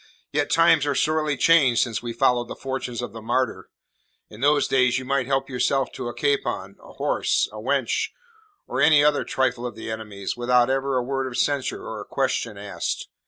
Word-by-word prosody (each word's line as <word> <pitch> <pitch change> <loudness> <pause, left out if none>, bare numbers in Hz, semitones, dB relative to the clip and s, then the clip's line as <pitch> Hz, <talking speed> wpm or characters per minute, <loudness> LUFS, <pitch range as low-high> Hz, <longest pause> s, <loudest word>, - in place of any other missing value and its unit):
"Yet 145 0 0
times 165 -3 +4
are 145 - 0
sorely 155 -1 +1
changed 140 -8 +4
since 115 -3 -3
we 120 -1 -4
followed 120 +1 +1
the - - -7
fortunes 130 -3 -4
of 120 - -5
the 115 - -8
Martyr. 115 -4 -1 0.6
In 105 - -12
those 145 +1 +3
days 125 -1 +3
you 130 - -5
might 135 -1 0
help 135 0 0
yourself 135 +1 0
to 125 - -6
a 120 - -4
capon, 420 -2 -1
a - - -14
horse, - - 0
a - - -10
wench, 450 -1 0 0.6
or - - -2
any 145 -1 +6
other 150 -1 +3
trifle 130 -2 -1
of 120 -3 -5
the 110 0 -6
enemy's, 105 -3 -5
without 120 +1 +3
ever 135 0 0
a 125 - 0
word 135 +1 -2
of 120 - -5
censure 145 -3 -1
or 110 -2 -6
a - - -9
question 125 -5 -2
asked. 100 0 -4
130 Hz, 200 wpm, -24 LUFS, 120-145 Hz, 0.6 s, any